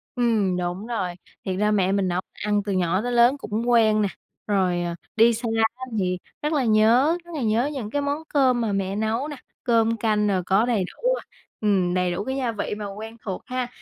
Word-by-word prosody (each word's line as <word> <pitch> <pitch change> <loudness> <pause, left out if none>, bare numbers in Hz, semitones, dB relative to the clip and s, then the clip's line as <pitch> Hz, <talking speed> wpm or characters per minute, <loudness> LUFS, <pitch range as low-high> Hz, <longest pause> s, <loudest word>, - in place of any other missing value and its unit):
Ừm, 220 -7 +1
đúng 180 +4 -3
rồi. 185 -7 -2 0.3
Thiệt 190 - -1
ra 210 0 +2
mẹ 190 -3 +2
mình 195 -1 +1
nấu 180 0 0
ăn 205 0 0
từ 205 - -2
nhỏ 185 0 +1
tới 245 +2 -2
lớn 240 +3 +5
cũng 230 -2 -3
quen 220 -3 +4
nè. 205 - +2 0.4
Rồi, 185 -4 +1
ờ, 170 -1 -3 0.2
đi 230 +1 +6
xa 235 +1 -3 0.3
á 255 - -9 0.2
thì 180 -1 0 0.2
rất 300 +2 -1
là 285 -3 +2
nhớ, 230 +9 +4
rất 345 - -12
là 295 - -3
nhớ 230 +4 +1
những 245 -7 -4
cái 285 +5 -1
món 285 +2 -2
cơm 260 -4 +3
mà 225 -2 0
mẹ 195 -1 -1
nấu 220 +6 -1
nè, 300 - -6 0.3
cơm 230 -2 +2
canh 210 -1 +1
rồi 190 -3 +1
có 195 +5 +3
đầy 230 -6 +1
đủ, - - -1
à, - - -7 0.4
ừm, 190 -4 +2
đầy 180 -1 +1
đủ 180 +3 -2
cái 265 +4 -3
gia 250 -3 0
vị 210 -1 -3
mà 210 - -5
quen 220 +2 -8
thuộc 190 -3 -4
ha. 255 -1 -2
215 Hz, 230 wpm, -24 LUFS, 195-245 Hz, 0.4 s, đi